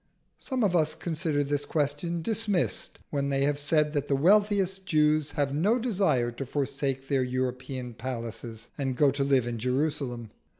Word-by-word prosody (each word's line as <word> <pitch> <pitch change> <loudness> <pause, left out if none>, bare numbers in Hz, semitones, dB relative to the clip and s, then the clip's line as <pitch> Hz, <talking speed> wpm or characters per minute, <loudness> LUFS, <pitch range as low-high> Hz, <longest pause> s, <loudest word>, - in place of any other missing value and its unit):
Some 260 -3 -2
of 190 -4 +2
us 155 -2 +2
consider 160 -3 -1
this 145 0 -1
question 150 +3 -1
dismissed 215 -4 -1
when 140 -1 0
they 135 0 +1
have 145 0 +1
said 150 +1 +2
that 145 -1 -1
the 140 - +2
wealthiest 195 +3 +3
Jews 155 -1 +3
have 140 -2 +1
no 195 - +3
desire 190 - +1
to 130 +3 -5
forsake 135 -1 -2
their 135 -2 +2
European 125 0 -3
palaces, 115 -1 -6
and 135 -2 -1
go 145 -2 +5
to 140 +1 -1
live 135 -3 +3
in 120 -1 -3
Jerusalem. 125 -2 -1
145 Hz, 165 wpm, -28 LUFS, 130-160 Hz, -, go